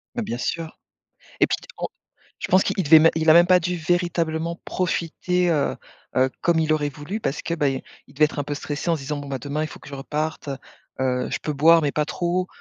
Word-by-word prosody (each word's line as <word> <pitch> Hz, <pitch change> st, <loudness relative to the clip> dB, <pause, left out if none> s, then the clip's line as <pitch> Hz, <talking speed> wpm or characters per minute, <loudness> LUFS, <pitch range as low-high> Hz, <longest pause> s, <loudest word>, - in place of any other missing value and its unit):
Bah, 240 Hz, -, -1 dB
bien 120 Hz, -, -3 dB
sûr 160 Hz, +5 st, -4 dB, 0.6 s
et -, -, +6 dB
puis -, -, 0 dB, 0.2 s
en -, -, -1 dB, 0.5 s
je -, -, -4 dB
pense 185 Hz, +1 st, +5 dB
qu'il -, -, -2 dB
il 190 Hz, -, +1 dB
devait 155 Hz, +2 st, +8 dB
même 165 Hz, +1 st, +6 dB
il 160 Hz, 0 st, 0 dB
a -, -, +10 dB
même 170 Hz, +2 st, +6 dB
pas 185 Hz, 0 st, +7 dB
dû, 180 Hz, +1 st, -2 dB
véritablement, 170 Hz, -1 st, -1 dB
profiter, 180 Hz, 0 st, -1 dB
heu, 150 Hz, -4 st, +1 dB, 0.4 s
heu, 130 Hz, +1 st, +3 dB
comme 170 Hz, -1 st, +2 dB
il 155 Hz, -1 st, +1 dB
aurait 150 Hz, -1 st, +1 dB
voulu 145 Hz, +9 st, -6 dB
parce 145 Hz, -7 st, -2 dB
que, 170 Hz, -, -2 dB
ben, 140 Hz, -5 st, 0 dB, 0.2 s
il 135 Hz, -, -19 dB
devait 150 Hz, +2 st, +5 dB
être 150 Hz, -, -9 dB
un 145 Hz, -, -1 dB
peu 145 Hz, -, -3 dB
stressé 145 Hz, +3 st, -3 dB
en -, -, +3 dB
disant: 150 Hz, 0 st, -4 dB
«Bon, 145 Hz, -, -7 dB
bah, 135 Hz, -1 st, -3 dB
demain 145 Hz, +4 st, -3 dB
il -, -, -1 dB
faut -, -, -12 dB
que -, -, -12 dB
je 140 Hz, -, -7 dB
reparte, 150 Hz, +2 st, -4 dB, 0.5 s
heu, 125 Hz, -1 st, 0 dB
je -, -, -1 dB
peux 150 Hz, -, -2 dB
boire 160 Hz, +3 st, +5 dB
mais 145 Hz, -, +1 dB
pas 150 Hz, -, +1 dB
trop, 175 Hz, +4 st, -1 dB
155 Hz, 245 wpm, -23 LUFS, 145-170 Hz, 0.6 s, a